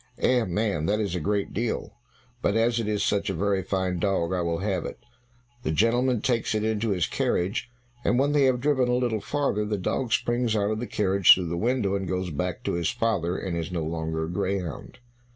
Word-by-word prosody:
"Eh, 125 -2 +3
man, 95 -4 -1
that 105 +1 +1
is 100 -5 -1
a 90 - -1
great 100 +5 -1
deal, 115 +1 -2 0.5
but 100 - +1
as 115 +1 +2
it 115 - -2
is 105 -1 0
such 100 -1 0
a 95 - -2
very 100 +2 +1
fine 95 -1 -1
dog 95 -2 0
I 90 - 0
will 85 -1 -1
have 95 -1 -1
it." - - -6 0.6
The - - -3
gentleman 120 +6 +2
takes 115 -3 0
it 110 - 0
into 110 0 0
his 90 -5 +1
carriage, 95 +9 -1 0.3
but - - +2
when 140 +3 +2
they 145 -2 +4
have 125 -2 +2
driven 135 -3 +2
a 125 - +2
little 120 -4 0
farther 140 -7 0
the 105 0 -2
dog 115 +6 -2
springs 120 -1 +1
out 105 0 +1
of 110 - -2
the 120 - -4
carriage 100 -2 +5
through 90 -3 -3
the 85 - -2
window, 110 0 0
and 95 -1 -2
goes 90 -1 -2
back 70 - -3
to - - -1
his 85 -1 0
father, 100 -7 0
and 90 -3 -3
is 85 0 -3
no 85 -3 -2
longer 80 0 -2
a - - -3
greyhound. 95 -2 -3
100 Hz, 225 wpm, -26 LUFS, 90-115 Hz, 0.6 s, carriage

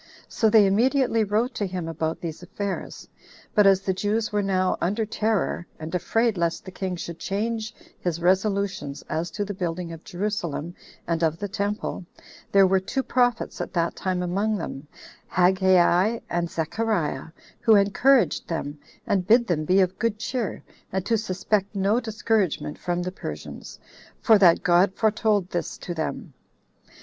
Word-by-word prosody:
So 220 - +2
they 215 -1 +6
immediately 230 +3 +2
wrote 220 +5 0
to 205 -3 -2
him 180 -3 -4
about 160 0 -2
these 165 -1 -5
affairs; 195 +2 -5 0.5
but 210 -2 +5
as 195 -1 +5
the 190 -1 0
Jews 215 +3 -1
were 210 -1 +1
now 185 -2 +1
under 210 +6 0
terror, 215 -5 -1
and 155 +2 -7
afraid 225 +3 +1
lest 170 -1 -1
the 185 - -8
king 185 -1 -3
should 170 -1 -7
change 220 +2 -3 0.2
his 170 -2 -2
resolutions 190 -5 0
as 160 +3 -2
to 205 +5 -3
the 205 - -4
building 175 -2 -3
of 165 0 -9
Jerusalem 175 -4 -3 0.3
and 170 -1 -1
of 160 -1 +1
the 205 - -4
temple, 200 -1 -3 0.5
there 195 -1 +6
were 190 0 +3
two 265 +8 -2
prophets 245 -3 0
at - - -5
that 170 -2 0
time 185 -1 -2
among 200 +5 0
them, 140 -5 -6 0.4
Haggai 185 +3 +3
and 170 -1 0
Zechariah, 165 -4 -1 0.3
who 225 - +5
encouraged 205 - +3
them, 150 -3 -4 0.3
and 185 -2 0
bid 235 +3 +5
them 155 -6 -1
be 185 +4 +4
of 185 0 0
good 230 -2 0
cheer, 235 -1 -3 0.3
and 190 0 -2
to 230 - +2
suspect 200 0 -1
no 200 +4 +2
discouragement 220 -8 -1
from 175 0 -2
the 180 - -3
Persians, 190 - -8 0.4
for 220 -3 +5
that 175 -4 +5
God 185 +1 +4
foretold 215 -3 +1
this 175 - -3
to 175 - -6
them. 160 -2 -4
190 Hz, 160 wpm, -25 LUFS, 175-215 Hz, 0.5 s, they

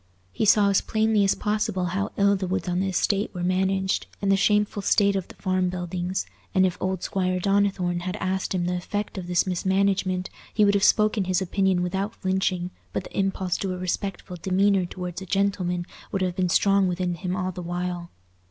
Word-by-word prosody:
He 220 - -1
saw 205 -1 +5
as 195 - +3
plainly 220 -1 +2
as 195 - +3
possible 210 -3 -1
how 200 +2 -1
ill 200 0 +4
the 190 -1 -3
woods 185 -1 -2
on 180 0 0
the 195 - 0
estate 195 +2 0
were 175 - -3
managed, 190 +1 0
and 200 -1 +1
the - - +5
shameful 210 +1 +2
state 200 0 +3
of 190 -3 -2
the - - -13
farm 185 -2 0
buildings; 180 +1 -3 0.3
and 190 0 +5
if 180 - 0
old 185 -1 -2
Squire 185 -1 0
Donnithorne 195 -2 +1
had 180 +2 -4
asked 190 -1 -2
him 175 -1 0
the 180 - 0
effect 205 +2 -4
of 180 - -7
this 175 -1 +2
mismanagement, 190 0 0 0.2
he 210 - +5
would 200 - +4
have 200 -1 +2
spoken 210 -2 +3
his 185 0 +1
opinion 190 -1 +1
without 195 +4 -2
flinching, 185 -1 -1 0.2
but - - -2
the - - -12
impulse 190 -2 0
to 190 -2 -2
a - - -5
respectful 180 0 -3
demeanour 195 0 +2
towards 180 0 -6
a 190 - -8
"gentleman" 185 -2 0 0.3
would 195 -2 0
have 180 -1 -1
been 185 -1 0
strong 195 +2 +4
within 180 0 -1
him 180 +2 -3
all 185 0 -2
the 180 - -7
while. 175 0 -4
190 Hz, 205 wpm, -25 LUFS, 180-200 Hz, 0.3 s, saw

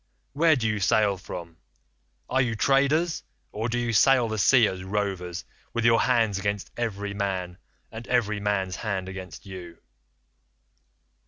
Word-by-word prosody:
Where 160 +2 +4
do 110 -4 -1
sail 100 0 +3
from? 85 -3 -9 0.7
Are 130 +1 +2
you 120 -3 0
traders, 140 +8 +2 0.3
or 110 +3 -3
do 120 - -1
you 120 -1 -1
sail 125 +2 +5
the 110 -1 -3
sea 120 +2 +5
as 95 -1 -5
rovers, 95 -3 -3 0.3
with 120 -1 0
your 115 0 +5
hands 115 -6 +2
against 100 0 -3
every 100 -4 -3
man, 95 -3 -3 0.3
and 115 +1 -8
every 105 -4 +1
man's 95 -3 -1
hand 95 -4 -3
against 95 -2 -8
you? 90 -3 -9
105 Hz, 145 wpm, -26 LUFS, 95-120 Hz, 0.7 s, sail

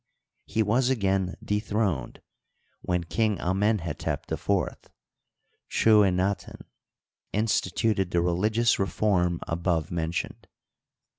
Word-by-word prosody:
he 110 - +1
was 120 +5 +2
again 95 -6 0
dethroned, 105 - -1 0.6
when 90 -1 -1
King 105 +4 0
Amenhetep 95 -3 -1
IV - - -1 0.9
(Chuenaten) 100 -3 +2 0.7
instituted 105 -2 0
the 85 - +1
religious 105 +7 +2
re 95 - +1
form 90 -5 +1
above 85 -1 -1
mentioned. 85 0 -3
95 Hz, 85 wpm, -27 LUFS, 85-110 Hz, 0.9 s, was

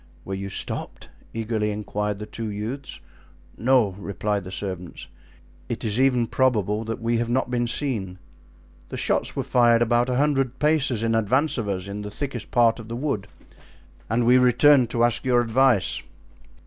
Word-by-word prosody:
"Were 95 - -5
you 100 +1 -4
stopped?" - - -5 0.2
eagerly 110 -1 -2
inquired 105 0 -3
the 105 - -6
two 110 0 -6
youths. 110 +7 -5 0.5
"No," 125 -3 +3
replied 100 0 -2
the 95 - -8
servants, 90 -3 -6 0.6
"it - - -4
is 110 +3 0
even 125 -3 +3
probable 110 -4 +1
that 115 +1 -4
we 115 0 0
have 120 0 -2
not 125 0 0
been 120 -1 0
seen; 110 -9 -2 0.7
the - - -5
shots - - 0
were - - -1
fired 120 -1 +4
about 120 +2 +2
a 125 - 0
hundred 135 -2 +1
paces 145 -7 +1
in 115 0 +1
advance 125 +7 +1
of 110 - -3
us, 95 -1 -3
in 100 +1 -5
the 105 - -6
thickest 135 +6 -5
part 120 -1 +3
of 110 - -9
the 115 - -4
wood, 120 -7 -2 0.8
and 115 +2 +1
we 125 +2 +6
returned 125 +1 +5
to 115 0 +1
ask 120 -1 +2
your 125 -2 +3
advice." 120 -2 +2
115 Hz, 175 wpm, -24 LUFS, 105-125 Hz, 0.8 s, we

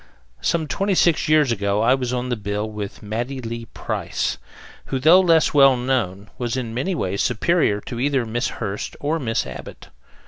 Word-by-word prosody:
Some 160 - +1
twenty 195 +5 0
six 170 -3 +3
years 155 -4 +4
ago 100 -1 0
I 125 - +5
was 125 -2 -1
on 125 0 -2
the 120 - 0
bill 105 0 -3
with 105 -2 -7
Mattie 120 +6 -3
Lee 115 -1 -5
Price, - - -3 0.5
who, 135 - -2
though 160 +8 +6
less 165 -4 +4
well 135 -3 +6
known, 110 -6 -2
was 120 0 -2
in 115 -3 -4
many 155 +11 -1
ways 100 - -1
superior 125 -3 +2
to 120 +2 -6
either 135 -2 +1
Miss 120 +2 -1
Hurst 100 +1 -5
or 155 +3 -1
Miss 115 -5 -1
Abbott. - - -9
125 Hz, 180 wpm, -22 LUFS, 110-145 Hz, 0.5 s, though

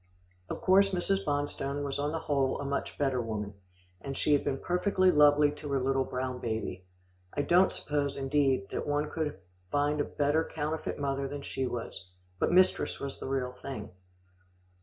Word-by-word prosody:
Of - - -4
course, 195 +1 +5
Mrs. 195 +1 0
Bonstone 145 -1 -1
was 140 0 -2
on 145 +1 0
the 165 - -1
whole 135 -2 +1
a 140 - -4
much 140 0 -3
better 135 -3 +1
woman, 105 -3 -4 0.5
and 135 +4 -5
she 150 - +2
had 145 - +3
been 135 - -1
perfectly 185 +3 +2
lovely 150 -1 +6
to 150 0 -8
her 135 - +2
little 135 +1 +1
brown 130 0 -3
baby. 110 -5 -3 0.5
I 145 - 0
don't 180 +4 +5
suppose, 145 -1 -2
indeed, 135 -6 +1
that - - -3
one 145 +1 0
could 155 -2 -2 0.3
find 145 +4 +1
a - - 0
better 150 +2 +1
counterfeit 155 0 -3
mother 140 -1 -1
than 140 0 -6
she 135 -2 -2
was, 115 -6 -5 0.3
but - - +2
mistress 185 +1 +3
was 140 -1 -5
the - - -5
real 130 -2 -1
thing. 125 -4 -7
145 Hz, 180 wpm, -30 LUFS, 135-150 Hz, 0.5 s, lovely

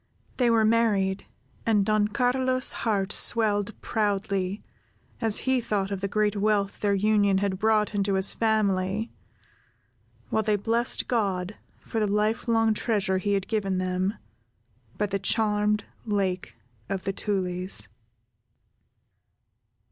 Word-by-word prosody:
They 245 -2 +3
were 225 -1 +4
married, 205 -4 +1 0.4
and 210 -3 +2
Don 215 0 +2
Carlos's 255 +2 +1
heart 205 -3 -1
swelled 215 -2 +2
proudly, 200 -2 -1 0.6
as 225 -3 +2
he 260 -1 +2
thought 200 -3 -1
of 195 -1 -3
the 200 - -1
great 210 +1 0
wealth 205 -1 0
their 205 -1 +1
union 205 -1 +3
had 190 -1 -1
brought 215 -1 +2
into 200 -1 0
his 190 +1 +1
family, 210 -1 0 1.2
while 220 - +2
they 215 -1 +1
blessed 230 +4 0
God 200 -4 -1 0.3
for 225 - -2
the 210 - +1
lifelong 220 +2 +1
treasure 205 -4 0
He 205 +2 0
had 195 -1 -1
given 195 -4 -1
them, 185 +2 -1 0.8
by 210 - +1
the 200 -1 -2
charmed 210 0 +1 0.2
Lake 195 -4 -2 0.3
of 190 -1 -3
the 195 - -2
Tulies. 185 - -2
205 Hz, 125 wpm, -26 LUFS, 195-220 Hz, 1.2 s, were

